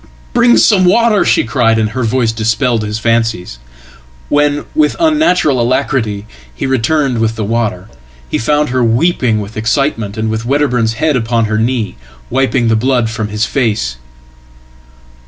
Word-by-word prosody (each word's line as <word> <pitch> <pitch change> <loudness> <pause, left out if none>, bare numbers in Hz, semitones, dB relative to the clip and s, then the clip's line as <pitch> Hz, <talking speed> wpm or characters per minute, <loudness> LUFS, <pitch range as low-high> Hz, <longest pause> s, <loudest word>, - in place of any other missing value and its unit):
"Bring 240 0 +4
some 200 -4 +4
water!" 215 +2 +3
she 115 - +2
cried, 115 0 +1
and 110 -1 0
her 130 +3 -3
voice 115 0 0
dispelled 115 +1 0
his 105 0 -3
fancies. 115 - -1 0.7
When, 145 0 +1
with 310 0 +1
unnatural 300 - +2
alacrity, 120 -4 -1 0.3
he 60 - -5
returned 135 0 0
with 115 0 0
the 110 - -3
water, 105 -3 -2 0.4
he - - -2
found 150 +5 +1
her 130 0 0
weepingwith 115 - 0
excitement, 115 -2 -1
and 110 0 -2
with 110 0 -3
Wedderburn's 125 -4 0
head 150 +5 0
upon 115 -1 0
her 110 0 -1
knee, 115 -2 -2 0.3
wiping 130 -1 +1
theblood 115 +1 +1
from 110 -1 -3
his 105 +2 -1
face." 105 - -1
115 Hz, 145 wpm, -13 LUFS, 110-140 Hz, 0.7 s, Bring